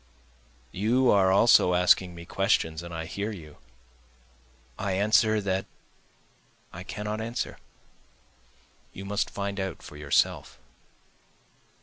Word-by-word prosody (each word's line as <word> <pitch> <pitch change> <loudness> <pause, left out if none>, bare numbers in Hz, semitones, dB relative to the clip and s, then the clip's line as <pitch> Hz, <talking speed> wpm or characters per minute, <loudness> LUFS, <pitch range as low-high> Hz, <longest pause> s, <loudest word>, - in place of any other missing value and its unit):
You 120 +6 +2
are 95 -2 +4
also 95 -3 +5
asking 90 0 +3
me 85 0 -10
questions 85 -4 0
and 85 0 -9
I 80 -1 -5
hear 100 +6 -4
you, 80 -7 -11 1.2
I 100 -2 -1
answer 110 +2 +3
that 95 -1 -2 1.1
I 90 - -8
cannot 105 +3 -5
answer, 115 +2 -4 1.3
you 95 - -8
must 100 +1 -1
find 100 0 -4
out 95 -1 -4
for 75 - -11
yourself. 75 -1 0
95 Hz, 110 wpm, -27 LUFS, 90-105 Hz, 1.3 s, also